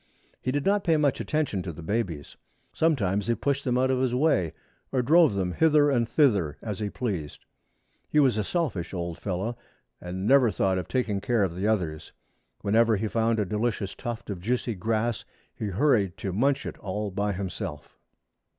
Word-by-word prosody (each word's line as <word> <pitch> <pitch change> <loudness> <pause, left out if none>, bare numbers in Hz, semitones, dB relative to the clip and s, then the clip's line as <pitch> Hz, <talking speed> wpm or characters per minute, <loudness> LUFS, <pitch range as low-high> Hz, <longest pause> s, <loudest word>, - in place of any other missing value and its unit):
He 130 - -1
did 145 +1 -1
not 200 0 +2
pay 165 -4 +3
much 145 -2 +1
attention 150 -11 -1
to 90 - -5
the 80 +1 -10
babies. 85 -7 -3 0.4
Sometimes 105 - +1
he 120 - +2
pushed 140 +2 -1
them 125 -1 +1
out 130 +1 +2
of 130 - +1
his 130 -1 +1
way, 125 - +2 0.4
or 130 -2 +1
drove 155 -3 +5
them 95 -2 -1
hither 150 - +4
and 120 -3 +1
thither, 100 - +2
as 105 -4 -4
he 105 -1 -2
pleased. 95 - -4 0.6
He 150 - +3
was 135 -5 +4
a 105 - 0
selfish 100 - -2
old 85 -1 -4
fellow 100 +5 -3 0.4
and 90 +2 -5
never 130 0 +5
thought 95 -2 +1
of 90 - -6
taking 110 -6 -1
care 115 0 +1
of 90 -3 -1
the 95 +3 -1
others. 85 -8 -1 0.5
Whenever 110 +2 +3
he 110 +3 -1
found 115 +1 +1
a 105 - +1
delicious 105 0 -2
tuft 120 -3 -6
of 90 -3 -6
juicy 120 +3 -1
grass 110 +2 -1 0.3
he 110 - -4
hurried 100 -3 +2
to 95 - -4
munch 135 +7 +1
it - - -6
all 105 +1 -3
by 100 +2 -1
himself. 90 -5 -6
110 Hz, 185 wpm, -27 LUFS, 95-130 Hz, 0.6 s, drove